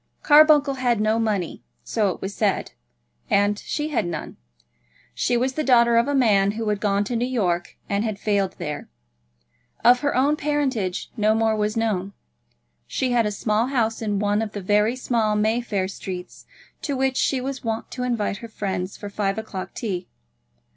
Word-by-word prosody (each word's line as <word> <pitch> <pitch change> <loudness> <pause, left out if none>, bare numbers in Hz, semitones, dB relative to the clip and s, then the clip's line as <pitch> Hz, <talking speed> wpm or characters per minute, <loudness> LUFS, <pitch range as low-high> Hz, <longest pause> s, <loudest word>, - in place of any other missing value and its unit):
Carbuncle 295 -2 +6
had 240 -3 +2
no 215 +1 +2
money, 205 -6 -1 0.2
so 215 -3 0
it - - -5
was 195 +1 -4
said; 205 -3 0 0.6
and 205 +1 +2
she 300 0 -3
had 235 - 0
none. 160 -3 -5 0.8
She 245 - +1
was 260 +2 0
the 310 - -1
daughter 235 -3 +5
of 235 +2 +4
a 285 - 0
man 205 -6 +3
who 225 0 -4
had 210 -1 0
gone 200 -1 +2
to 235 +4 -3
New 230 - 0
York 180 -9 -1
and 200 +1 0
had 215 -3 -2
failed 200 -2 0
there. 150 0 -5 1.0
Of 245 +1 +7
her 285 +2 0
own 280 +4 +3
parentage 265 -11 -1
no 215 -1 +2
more 225 -1 +2
was 215 +1 -1
known. 200 -4 -1 0.7
She 255 -1 -1
had 235 -3 +3
a - - -2
small 215 +3 0
house 235 -5 0
in 210 -2 -1
one 205 +1 +1
of 215 -2 -4
the 205 - -4
very 210 +5 +2
small 230 -4 0
Mayfair 215 -2 0
streets, 185 -2 -8 0.3
to 280 -3 -2
which 265 0 +1
she 270 - +1
was 265 +1 -5
wont 225 -1 -3
to 255 - -5
invite 235 -5 -1
her 230 - -8
friends 190 -3 -4
for 205 - -7
five 195 -1 -1
o'clock 190 -4 -6
tea. 190 -6 -3
220 Hz, 180 wpm, -23 LUFS, 200-250 Hz, 1.0 s, Of